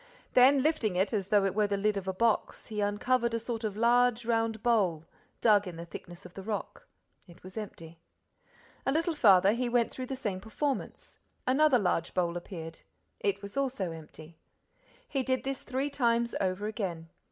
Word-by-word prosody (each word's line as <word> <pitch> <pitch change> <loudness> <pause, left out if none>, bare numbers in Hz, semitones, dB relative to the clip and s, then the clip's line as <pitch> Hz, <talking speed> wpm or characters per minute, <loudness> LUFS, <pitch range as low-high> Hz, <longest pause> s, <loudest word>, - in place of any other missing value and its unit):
Then, 260 +2 +6
lifting 270 - +1
it 190 +5 +1
as 200 -3 -1
though 205 -1 +3
it 195 - 0
were 210 0 +2
the 200 0 -1
lid 210 +1 +1
of 195 -1 -4
a - - +1
box, 225 +3 0
he 210 -1 -4
uncovered 235 +4 +1
a - - 0
sort 230 0 -5
of 210 -2 -3
large 240 0 +3
round 225 -2 0
bowl, 190 -10 +2 0.4
dug 210 -3 +4
in 175 - -6
the 170 +1 -7
thickness 175 0 -10
of - - -11
the 195 - -7
rock. 210 +1 -5 0.4
It 175 -1 -17
was 185 0 -11
empty. 170 -6 -8 0.8
A - - +1
little 330 +3 +1
farther, 200 -9 +6
he 240 +2 -1
went 235 -1 +2
through 255 -1 -6
the 265 - -3
same 210 -8 -3
performance. 270 +7 -4 0.3
Another 270 +1 +4
large 180 -5 -1
bowl 175 -2 +1
appeared. 165 -2 -7 0.4
It 200 0 -1
was 200 0 -8
also 260 -10 -1
empty. 160 0 -12 0.7
He 275 - -1
did 260 0 0
this 270 -1 -3
three 270 +3 -2
times 235 -3 +1
over 190 +1 -1
again. 180 -7 -4
215 Hz, 185 wpm, -30 LUFS, 185-245 Hz, 0.8 s, Then